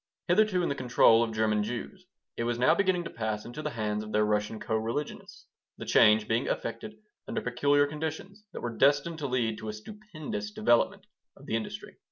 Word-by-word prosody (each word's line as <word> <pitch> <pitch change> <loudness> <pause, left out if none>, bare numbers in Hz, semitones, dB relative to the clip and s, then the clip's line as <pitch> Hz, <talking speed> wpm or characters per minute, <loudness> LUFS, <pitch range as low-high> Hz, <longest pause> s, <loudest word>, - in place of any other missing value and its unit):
Hitherto 210 -5 +3
in - - 0
the - - +1
control 125 -3 +4
of 115 -1 0
German 110 -1 +1
Jews, 150 - -6 0.3
it - - -2
was 120 0 -1
now 125 - +4
beginning 185 -3 +1
to - - -7
pass 110 -2 -3
into 120 +6 -7
the 150 - -2
hands 105 -4 -2
of 105 - -8
their 105 0 +2
Russian 105 +1 -1
co 110 - -2
religionists, 115 +7 -4 0.3
the - - -7
change 105 0 +5
being 115 +1 0
effected 210 - -4 0.3
under - - -2
peculiar 145 +4 +2
conditions 160 +7 -6
that - - -7
were 120 -1 -4
destined 145 +5 +2
to 145 - -2
lead 115 -4 -1
to 110 - -6
a - - -4
stupendous 155 - -7
development 120 +3 +1 0.3
of - - -15
the - - -2
industry. 115 - -5
120 Hz, 200 wpm, -29 LUFS, 110-155 Hz, 0.3 s, change